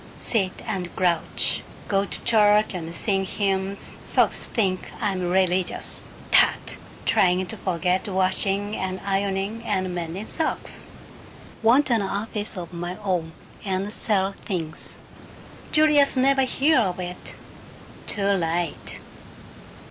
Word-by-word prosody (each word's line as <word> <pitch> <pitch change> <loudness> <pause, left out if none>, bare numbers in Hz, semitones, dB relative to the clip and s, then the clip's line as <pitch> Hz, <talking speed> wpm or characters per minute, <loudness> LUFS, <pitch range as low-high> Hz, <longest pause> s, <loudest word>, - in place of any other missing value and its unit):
Sit 195 -5 -1
and 180 -3 -3
grouch. 175 -3 +2 0.3
Go 195 -1 +2
to - - -4
church 210 -1 +4
and 170 -2 -5
sing 195 -1 +1
hymns. 195 0 -1 0.2
Folks - - +3
think 190 -5 -2
I'm 190 -5 -1
religious. 185 0 +1 0.3
Tut! - - +3 0.3
Trying 185 -4 +3
to 180 - -6
forget 185 0 0
washing 195 +2 +1
and 190 0 -3
ironing 195 +2 -1
and 185 -5 -1
mending 175 +4 -4
socks. 320 +6 -2 0.7
Want 245 +5 +4
an 230 -2 +3
office 205 +1 -3
of 175 0 -7
my 175 +2 -4
own, 175 -5 -1 0.3
and 195 +1 -2
sell 195 -4 +1
things. 165 -5 -4 0.7
Julius 300 -3 +5
never 270 +1 +4
hear 275 +3 +3
of 185 -5 0
it. 180 0 -6 0.7
Too 200 -2 0
late." 175 -4 -1
195 Hz, 120 wpm, -24 LUFS, 180-210 Hz, 0.7 s, Julius